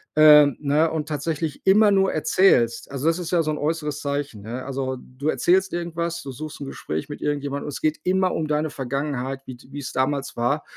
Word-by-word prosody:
Ähm, 150 -3 +7
ne, 150 +3 +2
und 155 -2 -3
tatsächlich 155 0 -3
immer 205 +2 +6
nur 195 -1 +3
erzählst 135 -8 +3
also, 140 +2 -4
das 165 +2 +2
ist 175 -1 -5
ja 170 -2 +3
so 155 - -1
'n 150 - -3
äußeres 150 -1 -2
Zeichen, 140 -6 -3
ne? 120 +4 -6
Also, 130 -1 -3
du 130 +4 -7
erzählst 190 +3 +2
irgendwas, 170 0 -3
du 135 - -6
suchst 155 +4 -8
'n - - -4
Gespräch 80 -11 -5
mit 145 - -7
irgendjemandem 145 -1 -2
und 145 - -4
es - - -6
geht 155 0 0
immer 185 0 +1
um 155 -1 -2
deine 150 +1 0
Vergangenheit, 135 0 -3
wie 130 - -7
d 120 - -18
wie's 140 -2 -6
damals 135 +2 -1
war. 140 +6 0
150 Hz, 210 wpm, -23 LUFS, 135-160 Hz, -, Ähm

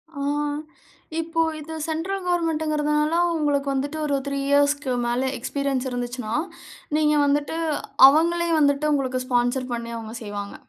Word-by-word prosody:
ஆ. 280 - -5 1.0
இப்போ 330 0 -1 0.2
இது 320 +2 -8
சென்ட்ரல் 360 +5 -2
கவர்ன்மென்ட்ங்கிறனால 305 -2 +1 0.2
உங்களுக்கு 290 -2 0
வந்துட்டு 285 +3 -2
ஒரு 285 -1 +1
3 280 0 -2
இயர்ஸ்க்கு 285 -1 +2
மேல 250 +2 0
எக்ஸ்பீரியன்ஸ் 270 0 -2
இருந்துச்சுனா, 245 -2 -4 0.6
நீங்க 300 -1 +3
வந்துட்டு 290 +3 0 0.5
அவங்களே 340 +3 +2
வந்துட்டு 290 +1 +2
உங்களுக்கு 260 -2 -1
ஸ்பான்சர் 245 0 0
பண்ணி 235 0 -4
அவங்க 225 0 -7
செய்வாங்க. 205 -1 -6
285 Hz, 125 wpm, -24 LUFS, 255-310 Hz, 1.0 s, நீங்க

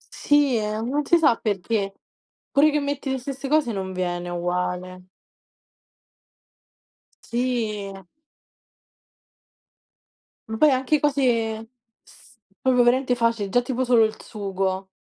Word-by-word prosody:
Sì 285 -5 +3
non 225 +7 -2
si 340 - +5
sa 300 -8 +4
perché. 200 -1 -2 0.6
Pure 295 +2 +5
che 300 - +1
metti 280 -1 -3
le 265 - 0
stesse 270 +2 -6
cose 295 -4 +2
non 190 -2 -4
viene 175 -1 -3
uguale. 180 +1 -3 2.2
Sì. 230 -5 -2 2.6
Ma 220 - -3
poi 305 +1 +5
anche 265 +3 +1
cose 230 -6 0 0.3
s 260 -4 -21 0.2
proprio 250 -2 +3
veramente 250 +1 +2
facili, 230 -3 0
già 245 +5 +3
tipo 255 +1 -2
solo 240 -2 +5
il 220 0 -2
sugo. 195 -2 -3
230 Hz, 110 wpm, -23 LUFS, 195-265 Hz, 2.6 s, si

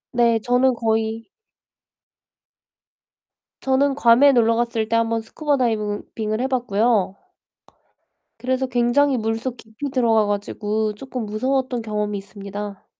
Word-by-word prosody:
네 235 -1 +4
저는 250 +1 +3
거의 225 0 -1 2.4
저는 270 +1 +2
괌에 265 +2 +6
놀러 230 -1 +3
갔을 230 -2 -1
때 230 - +1
한번 230 0 +1
스쿠버 290 +5 -1
다이빙은 215 -4 -1
빙을 215 0 -2
해 260 - 0
봤고요. 220 -5 +1 1.2
그래서 260 +1 -1
굉장히 250 +3 +2
물속 225 +3 -3
깊이 220 +6 -7
들어가 230 -4 +2
가지고 210 +1 -2
쪼끔 255 -1 -6
무서웠던 255 +3 -1
경험이 210 -1 -2
있습니다. 200 0 -8
230 Hz, 270 characters per minute, -22 LUFS, 215-255 Hz, 2.4 s, 괌에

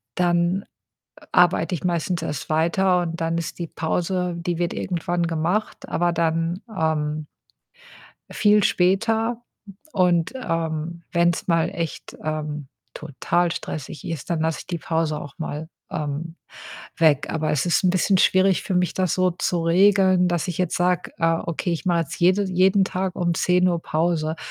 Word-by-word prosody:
dann 175 +2 +1 0.7
arbeite 180 +1 +3
ich 165 - -7
meistens 175 0 -1
erst 150 -4 -4
weiter 175 +4 +2
und 165 -1 -4
dann 165 0 0
ist 170 +1 -5
die 170 - -3
Pause 180 +3 -1
die 170 0 -3
wird 175 0 -1
irgendwann 175 -1 -2
gemacht, 170 +6 -2
aber 175 0 +1
dann, 165 +2 0
ähm 155 -2 -1 1.0
viel 210 -1 +3
später. 225 +7 +1 0.5
Und, 175 -1 +2
ähm, 165 -6 -3
wenn‘s 170 -1 +1
mal 165 -2 +3
echt, 165 -2 -5
ähm, 150 -2 -3 0.3
total 175 +5 -1
stressig 155 -2 -6
ist, 165 -6 -5
dann 165 -2 0
lasse 160 0 0
ich - - -17
die 175 - -3
Pause 160 -2 -1
auch 140 - -10
mal, 160 0 -5 0.2
ähm, 155 +3 -4 0.6
weg. 155 -4 +3
Aber 155 -1 -1
es 150 0 0
ist 175 +2 +2
‘n 180 - +5
bisschen 185 +1 +2
schwierig 185 +1 +3
für 190 - -3
mich, 180 0 +1
das 185 -3 0
so 185 0 +2
zu 175 0 -1
regeln, 185 +1 +4
dass 175 0 -1
ich 175 - -4
jetzt 180 -2 0
sage: 180 0 0
„Äh, 165 0 +2
okay, 170 +1 -2
ich 170 - -4
mache 170 -2 +3
jetzt 165 -1 -5
jede 185 +4 +4
jeden 190 +1 +3
Tag 185 0 -3
um 175 -1 0
10:00 180 0 +2
Pause.“ 160 0 0
170 Hz, 160 wpm, -23 LUFS, 160-180 Hz, 1.0 s, n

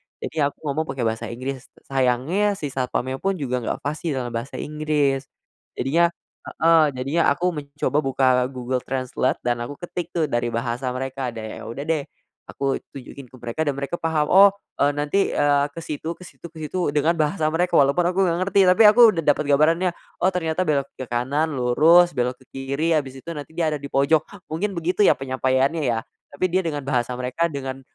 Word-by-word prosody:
Jadi 160 - -6
aku 145 -1 0
ngomong 155 +2 -2
pakai 130 -3 -3
bahasa 110 0 -2
Inggris. 130 +2 -6 0.2
Sayangnya 135 +11 +1
si 145 -6 -5
satpamnya 130 0 -2
pun 195 0 0
juga 125 -6 -2
nggak 115 - -4
fasih 150 +1 -2
dalam 120 -2 -3
bahasa 115 +3 -5
Inggris. 150 -3 -1 0.5
Jadinya 165 +7 +2 0.5
heeh, 165 0 +5
jadinya 140 +6 0
aku 180 +2 0
mencoba 145 -2 -3
buka 135 -2 0 0.2
Google 130 -1 -3
Translate 130 0 -1
dan 120 -1 0
aku 145 - -7
ketik 175 -1 -5
tuh, 165 - +2
dari 120 0 0
bahasa 120 +2 -2
mereka. 130 0 -3
Dan 110 - -6 0.2
ya - - -9
udah 120 +5 -5
deh, 155 -2 -1 0.4
aku 135 -1 -2 0.2
tunjukin 135 0 -10
ke 130 - -16
mereka 120 +5 -4
dan 145 - 0
mereka 140 +5 -4
paham, 155 -2 0
"Oh, 200 +2 +8 0.3
eee, 145 +1 +4
nanti, 150 +7 0
eee, 145 -1 +3
ke 165 - -6
situ 160 +2 -4
ke - - -14
situ 175 - -11
ke 165 - -16
situ," 155 -1 -2
dengan 150 +3 +3
bahasa 155 0 +1
mereka, 175 +2 0
walaupun 140 +6 +4
aku 180 +2 -1
enggak 170 -2 +1
ngerti. 200 - +3
Tapi 185 - +5
aku 215 +4 +6 0.2
udah - - -2
dapet 145 +1 +3
gambarannya, 165 +5 +3 0.3
oh 185 - +4
ternyata 175 -1 -1
belok 140 -5 0
ke 130 - -6
kanan, 140 +6 0
lurus, 155 +7 +4
belok 125 0 -1
ke 130 - -21
kiri, 140 +5 0
habis 135 -3 -2
itu 150 - -10
nanti 145 0 -8
dia 165 0 -1
ada 150 - -1
di 140 - -8
pojok. 145 +3 +3 0.2
Mungkin 185 +7 -2
begitu 180 +5 +1
ya, - - +7
penyampaiannya 130 +3 0
ya. 115 -2 +1 0.3
Tapi 145 - -1
dia 185 +1 +1
dengan 150 -4 -3
bahasa 125 -2 -1
mereka 125 +6 -1
dengan, 135 -2 -5
145 Hz, 195 wpm, -23 LUFS, 130-165 Hz, 0.5 s, Oh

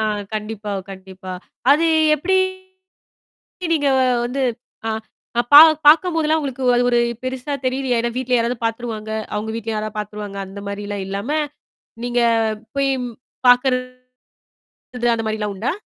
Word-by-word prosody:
ஆ - - +1 0.3
கண்டிப்பா, 210 -1 -4 0.2
கண்டிப்பா. 190 -1 -9 0.4
அது 310 +4 +5 0.3
எப்படி 380 +6 +1 1.4
நீங்க 290 -2 +1 0.4
வந்து 260 +3 -3 0.5
ஆ - - 0 0.6
பா - - +13 0.3
பாக்கும் 335 +3 +6
போது 320 -2 +1
எல்லாம் 315 +1 +3
உங்களுக்கு 265 -2 -4
அது 245 - +3
ஒரு 240 - +3 0.2
பெருசா 260 +2 -3
தெரிலயா? 255 -1 0
ஏன்னா 235 +1 -1
வீட்டுல 255 -1 +1
யாராவது 235 +1 0
பாத்துருவாங்க. 225 -1 -3 0.2
அவங்க 215 +1 -3
வீட்டுல 225 -1 -3
யாராவது 215 0 -4
பாத்துருவாங்க. 210 -1 -6
அந்த 195 +1 -9
மாதிரிலாம் 205 -1 -4
இல்லாம, 200 +7 -4 0.7
நீங்கப் 230 -3 +1 0.2
போய்ப்பாக்குறது 255 -1 0 1.1
அந்த 225 -1 -3
மாரி 215 0 -1
எல்லாம் 210 -1 -3
உண்டா? 220 +8 -2
240 Hz, 130 wpm, -20 LUFS, 210-260 Hz, 1.4 s, பா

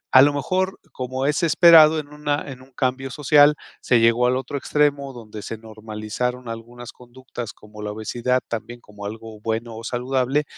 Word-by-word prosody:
a 130 - +11
lo 145 +2 +6
mejor, 185 +7 -1
como 130 +1 -4
es 145 +1 +1
esperado 160 -1 +7
en 150 - -7
una 150 0 -2
en 130 -1 -10
un 130 +1 -18
cambio 130 +1 -1
social, 145 +2 +5 0.3
se 120 - +3
llegó 115 +2 +4
al 125 - +2
otro 135 +2 -4
extremo 140 -1 0
donde 110 -3 -9
se 115 - -6
normalizaron 110 +3 -5
algunas 120 +1 -8
conductas 125 -1 -9
como 105 0 -13
la 105 0 -4
obesidad, 120 +4 -1
también 120 +1 -6
como 105 -2 -11
algo 110 0 -9
bueno 115 +1 -3
o 115 - -8
saludable, 130 +4 0
125 Hz, 175 wpm, -22 LUFS, 115-140 Hz, 0.3 s, a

